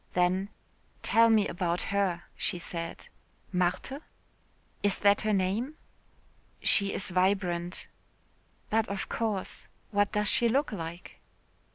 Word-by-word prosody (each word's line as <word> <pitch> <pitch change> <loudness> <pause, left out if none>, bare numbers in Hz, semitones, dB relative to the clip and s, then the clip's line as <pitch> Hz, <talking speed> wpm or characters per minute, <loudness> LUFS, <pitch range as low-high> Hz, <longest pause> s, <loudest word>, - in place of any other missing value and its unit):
Then: 185 +2 +2 0.5
"Tell 230 0 +5
me 215 -2 +4
about 175 0 -1
her," 185 -4 +1
she - - 0
said. 170 -1 -5 0.4
"Marthe?" 185 - -1 0.8
"Is 205 -1 +2
that 200 0 +4
her 215 - 0
name?" 205 +9 0 0.8
"She 200 -1 +3
is 190 - -1
vibrant." 180 -1 0 0.9
"But 220 0 +2
of 200 -1 -3
course. 215 -5 -2 0.2
What 205 -1 +2
does 210 -1 +2
she 235 +2 +4
look 275 +5 +1
like?" 170 -2 -7
195 Hz, 115 wpm, -29 LUFS, 180-215 Hz, 0.9 s, Tell